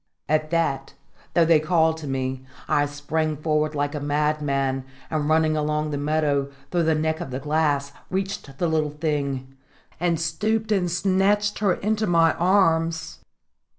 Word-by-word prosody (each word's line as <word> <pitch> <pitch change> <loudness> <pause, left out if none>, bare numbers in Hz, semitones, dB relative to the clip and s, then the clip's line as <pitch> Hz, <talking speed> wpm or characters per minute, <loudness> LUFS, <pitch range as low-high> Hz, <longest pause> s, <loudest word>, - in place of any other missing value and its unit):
At 155 0 +1
that, 150 -5 -1 0.4
though 170 - +5
they 165 -1 +5
called 160 0 +2
to 155 -2 -7
me, 130 -1 -2 0.2
I 145 0 +2
sprang 150 +2 -2
forward 155 0 0
like 145 0 -1
a 150 - -3
madman, 145 -2 0 0.3
and 155 -2 0
running 155 0 +3
along 150 0 -1
the 145 - -2
meadow, 145 -2 +1 0.2
through 175 -2 +1
the 160 0 +3
neck 160 +1 0
of 170 - -5
the 130 +1 -4
glass, 145 -1 0 0.2
reached 190 -7 -4
the 175 - 0
little 155 -2 +1
thing, 140 -3 -3 0.4
and 170 -1 +1
stooped 215 +8 -1
and 185 -4 +2
snatched 195 +3 +1
her 200 -4 +2
into 215 +1 -1
my 165 -2 +4
arms. 165 -3 +1
155 Hz, 155 wpm, -24 LUFS, 145-170 Hz, 0.4 s, though